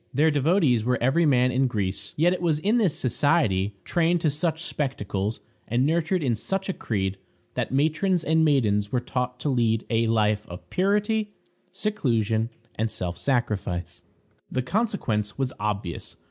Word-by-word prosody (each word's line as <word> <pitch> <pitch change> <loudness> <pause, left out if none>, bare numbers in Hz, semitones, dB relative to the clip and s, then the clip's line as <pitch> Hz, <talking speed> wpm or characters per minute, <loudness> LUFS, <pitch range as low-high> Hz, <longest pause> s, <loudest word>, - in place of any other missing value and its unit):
Their 155 +4 +3
devotees 145 - +3
were 125 +2 +1
every 150 +7 +3
man 125 -2 +4
in 130 +2 +2
Greece. 100 -3 -2
Yet 170 +4 +4
it 180 - -4
was 165 -4 +2
in 205 +10 +1
this 190 -9 +2
society, 110 - +2
trained 170 0 +2
to 155 -4 +2
such 160 +2 -2
spectacles, 110 - -2 0.3
and 120 +3 +1
nurtured 165 +2 +1
in 125 -4 +1
such 190 - -3
a - - 0
creed, 95 - -2 0.3
that - - -2
matrons 160 +6 +1
and 160 +1 +3
maidens 105 -9 +2
were 125 - +2
taught 125 0 -3
to 145 - 0
lead 115 -4 +1
a 115 0 +2
life 105 -2 +1
of 90 0 -10
purity, 210 +2 +1 0.4
seclusion, 115 - 0 0.2
and 110 +1 -1
self 90 -4 -4
sacrifice. 100 - -2 0.5
The 130 - -1
consequence 125 - -1
was 135 -2 -1
obvious. 105 -4 -3
130 Hz, 160 wpm, -25 LUFS, 105-165 Hz, 0.5 s, man